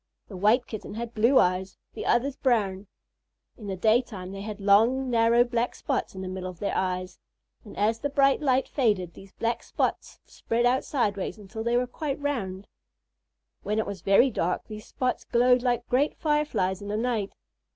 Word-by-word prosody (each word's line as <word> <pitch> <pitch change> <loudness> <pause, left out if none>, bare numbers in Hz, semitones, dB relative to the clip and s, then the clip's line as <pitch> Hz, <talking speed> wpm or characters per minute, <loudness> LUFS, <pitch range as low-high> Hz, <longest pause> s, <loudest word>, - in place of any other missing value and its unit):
The 200 - -9
White 215 +7 +3
Kitten 215 -1 -7
had 235 +1 -5
blue 230 +5 +3
ones, 185 -2 +2 0.2
the - - -5
others 260 +3 +2
brown. 205 -8 0 0.7
In 215 - -10
the 195 - -3
daytime, 215 -2 0
they 195 0 -7
had 210 0 -6
long, 230 +6 +3
narrow 230 +1 +4
black 240 0 -1
spots - - -3
in 190 - -6
the - - -5
middle 185 0 -5
of 180 - -10
their 200 - -2
eyes, 185 -1 -2 0.4
and 210 - -12
as 220 +2 +1
the 285 - -2
bright 275 0 +3
light 265 -2 +2
faded, 205 - 0
these 195 -1 -14
black 230 0 -2
spots - - -3
spread 235 +1 -2
out 255 +2 +2
sideways 205 -7 -1
until 215 +2 -7
they 235 +1 +1
were 250 - +1
quite 280 +3 -4
round. 205 -10 -3 0.9
When 210 +1 -2
it 220 - +1
was 200 -3 -6
very 200 +8 +4
dark, 180 -3 -1
these 215 -1 -9
spots 255 -1 -2
glowed 250 +1 +3
like 240 -1 0
great 275 +4 +1
Fireflies 265 - 0
in 200 - -7
the 210 +1 -2
night. 225 -4 -1
225 Hz, 185 wpm, -26 LUFS, 195-250 Hz, 0.9 s, narrow